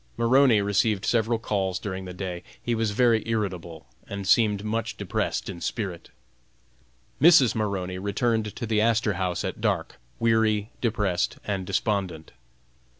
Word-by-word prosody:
Maroney 115 -2 +4
received 100 0 +1
several 115 0 +2
calls 95 -4 -1
during 95 -1 -5
the 90 - -7
day; 90 -2 -5 0.2
he 120 - -2
was 115 -1 0
very 115 +1 +3
irritable, 90 -7 -3 0.2
and 100 -1 -5
seemed 105 -1 +3
much 115 +2 -2
depressed - - -2
in 90 -3 -7
spirits. 95 -2 -4 1.1
Mrs. 150 -6 +7
Maroney 95 -4 -2
returned 105 +2 -1
to - - -4
the 110 -1 +1
Astor 110 -1 +2
House 90 -1 -2
at - - -5
dark, - - -1 0.2
weary, 110 -2 +2
depressed, 105 -6 0
and 95 -3 -3
despondent. 95 -5 -2
105 Hz, 140 wpm, -26 LUFS, 95-115 Hz, 1.1 s, Mrs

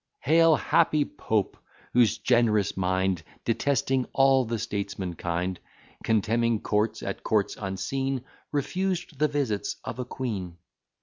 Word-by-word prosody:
Hail, 165 0 +5
happy 150 0 +2
Pope! 110 -3 -2 0.4
whose 120 -3 +4
generous 110 -5 +2
mind 95 -1 0 0.2
Detesting 130 +2 +1
all 135 -1 +4
the 115 +1 -2
statesman 100 -4 -3
kind, 85 +2 -2 0.4
Contemning 115 +1 +2
courts, 105 +1 0
at - - -4
courts 105 -2 +1
unseen, 125 +7 -2 0.3
Refused 175 0 -2
the 155 - +4
visits 135 -8 -1
of 125 - -6
a 125 - -2
queen. 100 -9 -4
115 Hz, 120 wpm, -27 LUFS, 100-135 Hz, 0.4 s, Hail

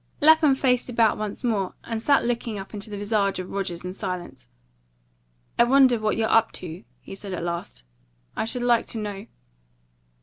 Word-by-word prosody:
Lapham 310 -2 +6
faced 255 -2 +1
about 230 -3 +2
once 215 +2 -4
more, 205 -6 -1
and 225 -1 -4
sat 280 +1 +3
looking 235 -2 -2
up 195 +2 -8
into 205 0 -4
the 205 - -5
visage 205 -1 0
of 185 0 -6
Rogers 180 -3 -4
in 180 - -4
silence. 180 - -6 1.1
"I - - +8
wonder 255 -1 +5
what 215 -1 0
you're 225 -1 +1
up 225 0 +3
to," 165 -5 -7 0.2
he - - -10
said 195 0 -7
at 170 - -5
last; 170 - -5 0.5
"I - - -1
should 240 +2 -2
like 240 -1 +3
to - - -4
know." 205 -2 -5
215 Hz, 180 wpm, -25 LUFS, 195-240 Hz, 1.1 s, I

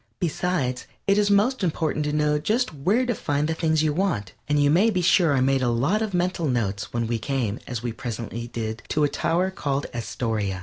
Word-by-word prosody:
Besides 170 -7 -1 0.2
it 200 +1 +3
is 205 0 +2
most 210 +4 +3
important 155 -3 0
to 150 - 0
know 150 0 +2
just 220 +7 0
where 195 - +1
to 245 - 0
find 145 -6 -1
the 160 - 0
things 160 -1 +1
you 155 -1 +1
want, 165 - -1
and 145 +1 +2
you 145 0 +4
may 190 +8 +4
be 185 -5 0
sure 170 -4 +4
I 130 - +2
made 135 0 +2
a 125 - +2
lot 140 - +1
of 220 -2 -1
mental 180 -2 0
notes 105 -6 -1
when 120 -1 -1
we 115 0 -1
came, 120 -3 -2
as 120 -3 -4 0.2
presently 115 -1 -5
we 120 - -5
did, 115 -1 -4
to 150 - +1
a - - +5
tower 170 +6 0
called 140 -6 -2
Astoria. 110 -5 -2
150 Hz, 220 wpm, -24 LUFS, 120-180 Hz, 0.2 s, a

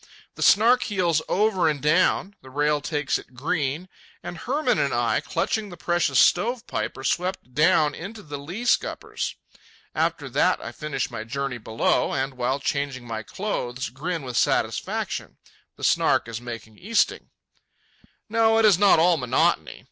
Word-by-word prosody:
The - - -11
Snark 235 +5 +5
heels 175 -6 +1
over 190 -4 +2
and 150 -2 -2
down, 175 +6 +2
the 130 - -13
rail 145 +2 +1
takes 150 -2 -1
it 125 - -16
green, 150 +4 -2 0.4
and - - -6
Hermann 280 - 0
and - - +1
I, - - +1
clutching 215 -2 -2
the 175 - -10
precious 175 +2 0
stove 235 +1 +3
pipe, - - -3
are 135 - -8
swept 180 -2 -2
down 150 0 +3
into 205 +7 -8
the 145 -2 -7
lee 175 +12 -6
scuppers. - - -1 0.6
After - - -1
that - - +2
I - - -7
finish 150 -2 -4
my 115 -2 -5
journey 135 +2 -4
below, 110 0 0
and 135 0 -1
while 130 +2 -1
changing 140 -3 -2
my 115 -2 -4
clothes 130 - -4
grin 160 +6 -4
with 125 -2 -4
satisfaction—the - - -2
Snark - - +3
is 115 0 -6
making 115 -3 -9
easting. 220 +3 0 1.0
No, 225 0 +3
it 225 - +4
is 195 -4 +5
not 200 -4 +6
all 170 +1 +4
monotony. 125 -2 0
150 Hz, 155 wpm, -24 LUFS, 130-190 Hz, 1.0 s, not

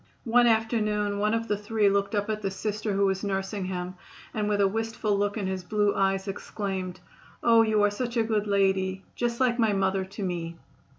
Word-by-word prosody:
One 240 +1 +5
afternoon 215 -3 +1
one 210 +2 +2
of 230 0 -2
the 210 - +1
three 210 0 +1
looked 200 +2 +1
up 205 0 0
at 215 -1 -2
the 195 - -1
Sister 210 +2 -3
who 200 +1 +2
was 190 0 0
nursing 195 0 -2
him, 180 -1 -4 0.4
and 210 -1 -1
with 205 -1 +1
a 200 - +5
wistful 225 0 -1
look 205 +1 0
in 205 - -2
his 190 -1 -3
blue 205 +2 +1
eyes 195 0 +1
exclaimed: 195 -2 -4 0.4
"Oh, 230 -1 +6
you 215 -2 +3
are 205 - +4
such 240 +3 -3
a 230 - +4
good 215 -2 0
lady; 190 -1 +1
just 240 0 -1
like 250 -2 +2
my 220 -3 +3
mother 190 -1 +1
to 195 +2 -7
me." 170 -2 -3
205 Hz, 210 wpm, -27 LUFS, 195-220 Hz, 0.4 s, Oh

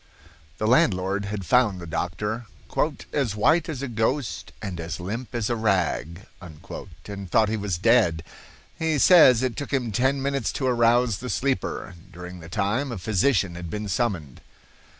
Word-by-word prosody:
The 110 - -2
landlord 100 -4 +2
had 100 -1 -4
found 120 -6 +3
the 85 - -8
doctor 105 +8 -3 0.7
"as 130 -8 0
white 160 +10 +3
as 140 -4 -4
a - - -2
ghost 120 +2 -2
and 95 -5 -5
as 80 -1 -5
limp 115 +8 -5
as 115 -3 0
a 120 - 0
rag," 95 -4 -1 0.2
and 95 +3 -9
thought 110 +3 +3
he 110 - 0
was 100 -5 -2
dead. 90 -6 +3 0.6
He 160 -2 +1
says 135 -8 +7
it 125 -3 -1
took 145 - -5
him 125 -5 0
ten 130 +6 +1
minutes 140 -3 -1
to 135 - -2
arouse 120 -3 +3
the 125 - -6
sleeper. 130 -10 -2 0.2
During 90 0 -9
the 80 -1 -11
time 105 +9 -1
a 115 - -4
physician 100 +1 +1
had 85 -1 -7
been 105 +4 -4
summoned. 95 - -2
110 Hz, 165 wpm, -25 LUFS, 90-125 Hz, 0.7 s, says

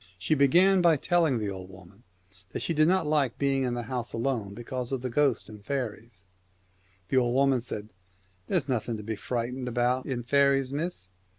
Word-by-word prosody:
She 90 +11 0
began 175 +7 +5
by 170 -3 +5
telling 165 -3 +2
the 105 -3 -2
old 95 -1 -8
woman 95 +3 -15 0.5
that - - -3
she 170 - 0
did 155 0 +4
not 185 +2 +2
like 145 -5 +1
being 140 -1 +1
in 125 -2 -1
the 120 - -3
house 120 0 -4
alone 115 -4 -2
because 120 +2 -5
of 130 -2 -2
the 130 - -3
ghosts 140 -2 +1
and 105 -2 -12
fairies; 115 -5 -5 0.6
and 90 0 -36
the 130 - +2
old 120 0 0
woman 135 -2 +3
said, 105 -3 -6 0.3
* 95 -1 -37
There's - - 0
nothing 120 -3 -1
to 105 - -8
be 110 +1 -3
frightened 125 +3 -3
about 125 +1 0
in 125 -3 -3
faeries, 140 0 +2
miss. 150 - -3
125 Hz, 200 wpm, -28 LUFS, 110-140 Hz, 0.6 s, began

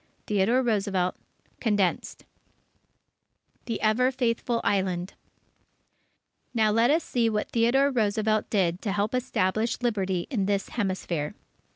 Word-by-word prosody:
Theodore 210 +6 +2
Roosevelt 195 -5 0 0.5
(Condensed) 205 -6 -1 1.4
THE 230 -3 -3
EVER 240 +4 +3
FAITHFUL 240 -2 0
ISLAND 185 -2 0 1.4
Now, 220 -2 +3
let 230 +3 +3
us 315 +2 +3
see 235 -2 +1
what 210 -1 -2
Theodore 255 +5 +3
Roosevelt 215 -2 0
did 180 -4 +1
to 205 -4 -2
help 205 +2 -1
establish 225 -3 0
Liberty 190 -6 0
in 200 -7 0
this 200 -1 -1
Hemisphere. 185 -8 -2
215 Hz, 110 wpm, -26 LUFS, 195-235 Hz, 1.4 s, EVER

